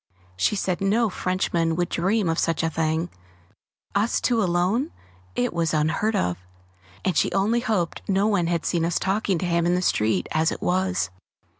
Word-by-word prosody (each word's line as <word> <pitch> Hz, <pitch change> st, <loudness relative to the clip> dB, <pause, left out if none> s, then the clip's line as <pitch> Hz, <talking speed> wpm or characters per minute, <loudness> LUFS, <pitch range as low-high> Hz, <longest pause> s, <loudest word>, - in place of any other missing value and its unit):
She 95 Hz, -, +1 dB
said 185 Hz, -2 st, -1 dB
no 210 Hz, +2 st, +2 dB
Frenchman 175 Hz, -3 st, 0 dB
would 175 Hz, +1 st, 0 dB
dream 195 Hz, +3 st, +1 dB
of 165 Hz, 0 st, 0 dB
such 165 Hz, -1 st, 0 dB
a 165 Hz, -, 0 dB
thing 160 Hz, +2 st, -1 dB, 0.8 s
us 205 Hz, +3 st, +1 dB
two 235 Hz, -2 st, +1 dB
alone 185 Hz, -, +1 dB, 0.4 s
it 125 Hz, -, 0 dB
was 165 Hz, -2 st, 0 dB
unheard 165 Hz, +8 st, +1 dB
of! 90 Hz, -, 0 dB, 0.7 s
and 185 Hz, -, +1 dB
she -, -, +2 dB
only 210 Hz, +5 st, +2 dB
hoped 210 Hz, -8 st, -1 dB
no 195 Hz, +1 st, +2 dB
one 200 Hz, -6 st, +2 dB
had 170 Hz, -1 st, -1 dB
seen 170 Hz, -2 st, +1 dB
us 170 Hz, +1 st, +1 dB
talking 195 Hz, -1 st, 0 dB
to 180 Hz, -, -2 dB
him 170 Hz, -1 st, +1 dB
in 175 Hz, -, +3 dB
the 180 Hz, -, 0 dB
street 105 Hz, -, +1 dB
as 160 Hz, +1 st, +2 dB
it -, -, -5 dB
was! 185 Hz, -, 0 dB
175 Hz, 180 wpm, -24 LUFS, 165-200 Hz, 0.8 s, in